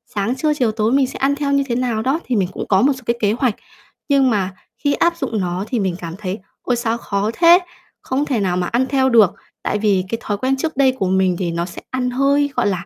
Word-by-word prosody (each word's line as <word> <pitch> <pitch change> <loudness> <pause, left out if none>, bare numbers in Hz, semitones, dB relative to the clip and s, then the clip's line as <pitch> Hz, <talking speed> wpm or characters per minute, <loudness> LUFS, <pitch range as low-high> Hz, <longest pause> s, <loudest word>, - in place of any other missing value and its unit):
sáng, 215 +5 0
trưa, 300 +3 +1
chiều, 245 -6 +1
tối, 215 +1 0
mình 270 0 +3
sẽ - - -8
ăn 280 +1 +2
theo 285 -1 -2
như 280 0 +3
thế 235 - -1
nào 240 -3 -1
đó 270 +7 0
thì 250 - -1
mình 190 -3 +1
cũng - - -5
có 190 -1 +3
một 280 +2 +4
số 260 - -11
cái 235 - +1
kế 205 -2 +2
hoạch, 240 -2 0 0.5
nhưng 275 -2 +4
mà 195 -4 0 0.2
khi 285 +3 0
áp 340 0 +1
dụng 225 -9 -2
nó 180 +2 -2
thì 245 -4 -1
mình 190 -3 -1
cảm 170 0 -6
thấy 195 0 -4 0.2
"Ôi 250 - 0
sao 235 -1 -1
khó 205 -2 -2
thế, 340 +4 +6 0.4
không 270 +3 -1
thể 260 -6 -1
nào 185 -3 0
mà 180 -1 -1
ăn 250 +3 +1
theo 265 -1 +2
được." 220 -6 +5 0.3
Tại - - 0
vì 200 -3 +2
cái 230 - -1
thói 205 -1 -2
quen 265 +4 0
trước 315 +1 -3
đây 270 -2 +4
của 190 - +1
mình 190 -1 +2
thì 175 -3 -1
nó 170 +1 -2
sẽ - - -9
ăn 255 -1 -1
hơi, 280 +3 +2
gọi 245 - +1
là, 180 -3 -2
235 Hz, 270 wpm, -19 LUFS, 195-270 Hz, 0.5 s, thế